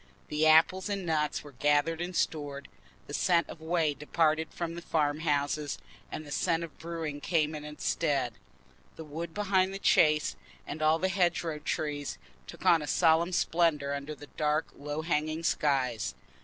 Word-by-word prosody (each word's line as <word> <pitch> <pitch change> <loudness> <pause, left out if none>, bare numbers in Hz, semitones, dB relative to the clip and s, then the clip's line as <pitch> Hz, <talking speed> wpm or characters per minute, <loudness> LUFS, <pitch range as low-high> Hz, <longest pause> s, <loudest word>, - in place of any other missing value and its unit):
The 155 +1 +2
apples 165 +5 +5
and 200 -2 -2
nuts 155 -2 0
were 145 - -11
gathered 145 +5 +1
and 180 +1 -4
stored; 145 -4 -2 0.4
the 145 - -9
scent 170 +1 +2
of 160 - -10
whey 160 -2 +1
departed 155 +2 +1
from 170 -1 -4
the 170 - -6
farm 150 -3 0
houses, 145 -1 0 0.3
and 155 - -5
the 145 - -10
scent 165 +2 +1
of 165 - -8
brewing 160 -3 -4
came 155 -2 +1
in 150 -1 -6
its 150 0 -8
stead. 140 -7 +1 0.6
The 160 - -8
woods 160 +2 -6
behind 195 -2 +1
the - - -2
Chase, 155 -5 +3 0.3
and 155 - -6
all 155 +1 +4
the 185 - 0
hedgerow 175 -4 0
trees, 150 -1 -3 0.3
took - - -10
on 165 -2 +6
a 150 - -5
solemn 165 +2 +3
splendour 165 -5 +1
under 140 +2 -5
the 145 +1 -11
dark 150 +1 -1
low 145 +2 -4
hanging 155 0 -1
skies. 125 - 0
155 Hz, 170 wpm, -30 LUFS, 145-170 Hz, 0.6 s, on